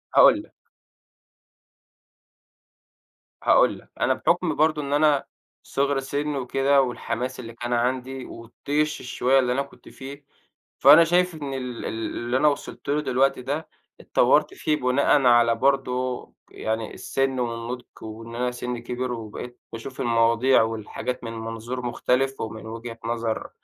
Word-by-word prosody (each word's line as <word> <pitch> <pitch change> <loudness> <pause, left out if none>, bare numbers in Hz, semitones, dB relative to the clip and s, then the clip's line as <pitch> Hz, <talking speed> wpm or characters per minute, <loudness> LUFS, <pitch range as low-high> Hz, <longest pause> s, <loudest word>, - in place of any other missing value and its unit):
هاقول - - +7
لك - - -21 2.9
هاقول - - +4
لك - - -21
أنا - - +3
بحُكم - - +1
برضه 155 0 +2
إن 140 0 -3
أنا 150 -2 +3 0.4
صغر 140 0 0
سن 145 +2 -2
وكده، 135 +1 +2
والحماس 125 0 -3
اللي 115 -2 -8
كان 120 +1 -4
عندي 130 +2 -1
والطيش 145 +6 -3
الشوية 130 +1 +2
اللي 125 -1 +1
أنا 135 - +1
كنت 140 - -11
فيه، 140 +1 -10 0.5
فأنا 145 +5 +9
شايف 175 +1 +2
إن 145 -3 -5
ال 125 -2 -5
ال - - -1 0.3
اللي 120 +2 -1
أنا 150 - +4
وصلت 145 0 -3
له 150 +1 +2
دلوقتي 130 -1 +1
ده 145 +5 -4 0.3
اتطوّرت - - +3
فيه 155 - 0
بناءًا 135 0 +3
على 120 -1 +5
برضه 130 -1 0 0.2
يعني 110 0 -3
السن 135 -1 -1
والنضج، 120 +1 -3 0.2
وإن 115 +1 -8
أنا 125 +1 -1
سنِّي 125 -1 -5
كِبِر، 125 +1 -3
وبقيت 120 +2 -7
باشوف 120 +3 -6
المواضيع 115 +2 +4
والحاجات 115 +3 -4
من 115 -1 -5
منظور 115 +2 -5
مختلف 130 +2 0
ومن 110 0 -6
وجهة 115 +1 -7
نظر 115 -1 -2
125 Hz, 140 wpm, -24 LUFS, 115-140 Hz, 2.9 s, فأنا